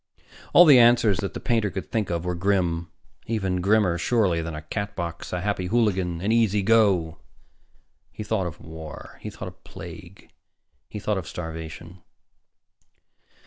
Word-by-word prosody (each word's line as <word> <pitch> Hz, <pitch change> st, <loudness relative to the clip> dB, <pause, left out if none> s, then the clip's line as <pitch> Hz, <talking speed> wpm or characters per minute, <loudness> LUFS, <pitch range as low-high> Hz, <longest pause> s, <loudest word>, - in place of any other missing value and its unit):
All 175 Hz, -, +9 dB
the 140 Hz, -6 st, +8 dB
answers 115 Hz, -5 st, +5 dB
that 100 Hz, -, -4 dB
the -, -, -3 dB
painter 115 Hz, -4 st, +1 dB
could 95 Hz, 0 st, -6 dB
think 110 Hz, -3 st, -1 dB
of 85 Hz, 0 st, -2 dB
were 90 Hz, -, -1 dB
grim. 85 Hz, -2 st, 0 dB, 0.4 s
Even 95 Hz, -5 st, -1 dB
grimmer, 100 Hz, -3 st, +2 dB
surely, 100 Hz, -9 st, +1 dB
than 80 Hz, -1 st, -5 dB
a 75 Hz, -, -7 dB
Catbox, 85 Hz, -1 st, -5 dB
a 90 Hz, -, -2 dB
Happy 95 Hz, -2 st, -1 dB
Hooligan, 95 Hz, -6 st, 0 dB
an 100 Hz, +4 st, 0 dB
Easy 110 Hz, -3 st, +2 dB
Go. 95 Hz, -7 st, +3 dB, 0.9 s
He -, -, -7 dB
thought 105 Hz, -3 st, -1 dB
of 85 Hz, -1 st, -8 dB
war. 80 Hz, -1 st, -10 dB
He -, -, -5 dB
thought -, -, -8 dB
of -, -, -12 dB
plague. -, -, -11 dB, 0.6 s
He -, -, -7 dB
thought 105 Hz, -1 st, -1 dB
of 85 Hz, -, -8 dB
starvation. 80 Hz, +1 st, -7 dB
95 Hz, 155 wpm, -25 LUFS, 85-110 Hz, 0.9 s, All